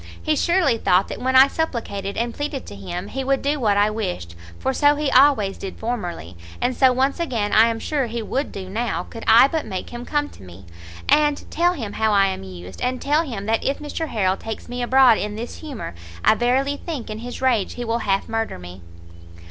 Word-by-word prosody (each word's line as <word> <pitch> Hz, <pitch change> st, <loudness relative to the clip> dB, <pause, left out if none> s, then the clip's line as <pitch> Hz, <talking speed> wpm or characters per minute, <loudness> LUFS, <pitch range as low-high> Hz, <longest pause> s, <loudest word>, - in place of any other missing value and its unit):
He 310 Hz, -, 0 dB
surely 340 Hz, -8 st, +2 dB
thought 185 Hz, -1 st, +2 dB
that -, -, -6 dB
when 260 Hz, +1 st, 0 dB
I 265 Hz, +1 st, +9 dB
supplicated 225 Hz, -11 st, -3 dB
and 235 Hz, 0 st, -1 dB
pleaded 290 Hz, -2 st, -4 dB
to 100 Hz, -, -9 dB
him, 175 Hz, -, -6 dB
he 270 Hz, +1 st, -3 dB
would 270 Hz, +1 st, 0 dB
do 290 Hz, +1 st, 0 dB
what 210 Hz, -5 st, +2 dB
I 205 Hz, +1 st, +3 dB
wished, 180 Hz, -, -4 dB, 0.2 s
for 265 Hz, -, -1 dB
so 290 Hz, +2 st, +4 dB
he 295 Hz, -2 st, -1 dB
always 255 Hz, -8 st, +4 dB
did 195 Hz, -, -7 dB
formerly, 180 Hz, -, -4 dB, 0.2 s
and 250 Hz, +1 st, 0 dB
so 260 Hz, -2 st, +5 dB
once 265 Hz, +4 st, +1 dB
again 230 Hz, -11 st, -1 dB
I 220 Hz, +1 st, +7 dB
am 230 Hz, -1 st, -1 dB
sure 275 Hz, 0 st, -1 dB
he 230 Hz, 0 st, -4 dB
would 270 Hz, +6 st, -2 dB
do 190 Hz, -1 st, -7 dB
now, 225 Hz, +5 st, -2 dB
could 230 Hz, -, -10 dB
I 230 Hz, +4 st, +8 dB
but 315 Hz, +2 st, -2 dB
make 190 Hz, -3 st, -5 dB
him 240 Hz, 0 st, -6 dB
come 295 Hz, +2 st, -1 dB
to -, -, -16 dB
me, 90 Hz, 0 st, -13 dB, 0.4 s
and 295 Hz, -1 st, +3 dB
tell 350 Hz, +2 st, +2 dB
him 225 Hz, -, -5 dB
how 220 Hz, -1 st, +1 dB
I 200 Hz, -1 st, +5 dB
am 190 Hz, -, -4 dB
used, 90 Hz, -1 st, -10 dB
and 250 Hz, 0 st, -1 dB
tell 295 Hz, +3 st, +2 dB
him 230 Hz, -11 st, -5 dB
that 225 Hz, +1 st, 0 dB
if 275 Hz, -, 0 dB
Mr 305 Hz, +2 st, -4 dB
Harrel 190 Hz, -7 st, 0 dB
takes 225 Hz, -, -7 dB
me 245 Hz, 0 st, -5 dB
abroad 250 Hz, -2 st, +5 dB
in 210 Hz, 0 st, -3 dB
this 235 Hz, +3 st, -6 dB
humour, 280 Hz, -, -7 dB, 0.3 s
I -, -, +7 dB
verily 260 Hz, +5 st, +1 dB
think 290 Hz, -10 st, -5 dB
in 215 Hz, -, -5 dB
his 245 Hz, +1 st, -7 dB
rage 245 Hz, -7 st, +1 dB
he 245 Hz, -, -5 dB
will 230 Hz, +1 st, 0 dB
half 195 Hz, -3 st, 0 dB
murder 225 Hz, 0 st, -2 dB
me." 90 Hz, +1 st, -11 dB
235 Hz, 225 wpm, -22 LUFS, 205-275 Hz, 0.4 s, I